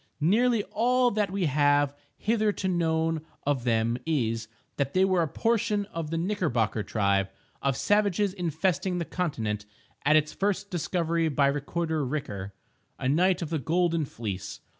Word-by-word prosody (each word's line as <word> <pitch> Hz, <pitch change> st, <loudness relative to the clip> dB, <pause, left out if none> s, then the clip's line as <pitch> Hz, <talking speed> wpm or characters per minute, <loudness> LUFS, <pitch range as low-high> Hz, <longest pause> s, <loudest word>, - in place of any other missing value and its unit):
Nearly 220 Hz, +7 st, +3 dB
all 245 Hz, +2 st, +3 dB
that 210 Hz, -2 st, 0 dB
we 190 Hz, -1 st, -1 dB
have 145 Hz, -1 st, +3 dB, 0.2 s
hitherto 215 Hz, -3 st, 0 dB
known 165 Hz, -2 st, +1 dB, 0.2 s
of 135 Hz, -4 st, 0 dB
them 115 Hz, +1 st, +1 dB
is, 115 Hz, -7 st, 0 dB, 0.3 s
that 140 Hz, +2 st, -1 dB
they 190 Hz, +1 st, +5 dB
were 185 Hz, -2 st, +2 dB
a 165 Hz, -, +1 dB
portion 210 Hz, +3 st, 0 dB
of 165 Hz, -2 st, -3 dB
the 165 Hz, -, -2 dB
Knickerbocker 165 Hz, -, 0 dB
tribe 100 Hz, -2 st, +1 dB, 0.3 s
of 135 Hz, -2 st, 0 dB
savages 205 Hz, -1 st, +2 dB
infesting 180 Hz, +1 st, -1 dB
the 170 Hz, -, -2 dB
continent 110 Hz, -, -2 dB, 0.4 s
at 150 Hz, +2 st, +4 dB
its 155 Hz, 0 st, +2 dB
first 200 Hz, +1 st, -1 dB
discovery 170 Hz, -1 st, 0 dB
by 145 Hz, -1 st, +2 dB
Recorder 155 Hz, +3 st, -1 dB
Riker, 125 Hz, -9 st, -4 dB, 0.5 s
a -, -, -2 dB
knight 175 Hz, +6 st, +3 dB
of 165 Hz, -, -6 dB
the 160 Hz, -, 0 dB
Golden 165 Hz, +2 st, +1 dB
Fleece. 105 Hz, -7 st, -6 dB
160 Hz, 150 wpm, -27 LUFS, 140-190 Hz, 0.5 s, they